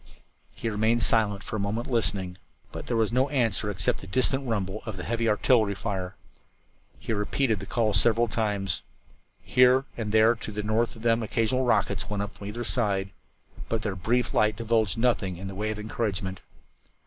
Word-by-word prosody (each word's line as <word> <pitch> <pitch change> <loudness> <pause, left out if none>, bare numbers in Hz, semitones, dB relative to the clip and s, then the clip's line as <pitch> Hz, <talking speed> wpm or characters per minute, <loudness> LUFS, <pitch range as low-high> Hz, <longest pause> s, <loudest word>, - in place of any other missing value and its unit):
He - - -6
remained 110 +2 +1
silent 105 -3 +2
for - - -5
a - - -3
moment 105 +4 -2
listening, 95 -6 -1 0.3
but - - -7
there 120 - 0
was 110 0 +1
no 130 +3 +2
answer 115 -6 +1
except 95 -1 -1
the 95 - -10
distant 130 +6 +1
rumble 105 -2 -2
of 110 -3 -5
the 90 - -5
heavy 115 0 0
artillery 105 -1 +3
fire. 95 -1 -4 0.8
He - - -3
repeated 110 +2 0
the 100 - -8
call 110 -3 +1
several 115 +3 +4
times. 100 -4 -1 0.6
Here 125 +1 +4
and 110 -3 -3
there 110 +2 +5
to 115 -2 -7
the 105 0 -4
north 110 +3 0
of 115 - -12
them 115 0 +3
occasional 115 +3 0
rockets 100 -5 +1
went 100 -1 -1
up 100 - -7
from 100 - -9
either 120 +4 -5
line, 100 -4 0 0.6
but 115 -1 -1
their 100 -3 -2
brief 120 +6 0
light 105 0 +3
divulged 115 -1 0
nothing 115 -7 +1
in 95 +2 -6
the 95 - -6
way 105 +3 -2
of 110 - -3
encouragement. 100 -3 -3
110 Hz, 185 wpm, -27 LUFS, 100-115 Hz, 0.8 s, there